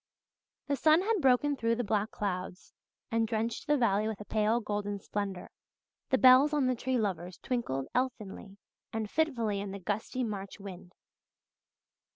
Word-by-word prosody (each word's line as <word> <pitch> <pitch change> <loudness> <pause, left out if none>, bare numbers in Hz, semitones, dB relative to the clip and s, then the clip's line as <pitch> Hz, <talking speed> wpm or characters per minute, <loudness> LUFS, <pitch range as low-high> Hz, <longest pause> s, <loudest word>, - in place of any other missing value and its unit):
The 285 - 0
sun 310 +5 +5
had 430 -2 +1
broken 270 +2 +3
through 230 -3 +1
the 245 - -1
black 210 0 0
clouds 185 -3 -4 0.4
and 225 0 +2
drenched 225 +1 -2
the 295 0 +3
valley 215 -4 +2
with 220 -3 -4
a 210 - -8
pale 215 +2 +2
golden 205 -2 -3
splendour. 195 -2 -4 0.6
The 260 - +3
bells 260 +4 +7
on 290 -3 +2
the 255 - +2
Tree 255 +1 -1
Lovers 185 -5 -2
twinkled 185 - -2
elfinly 215 -5 -3 0.3
and 220 -1 -2
fitfully 235 -11 0
in 200 - -5
the 200 +1 -6
gusty 210 +6 -2
March 200 -3 -5
wind. 185 -2 -10
220 Hz, 160 wpm, -31 LUFS, 200-255 Hz, 0.6 s, bells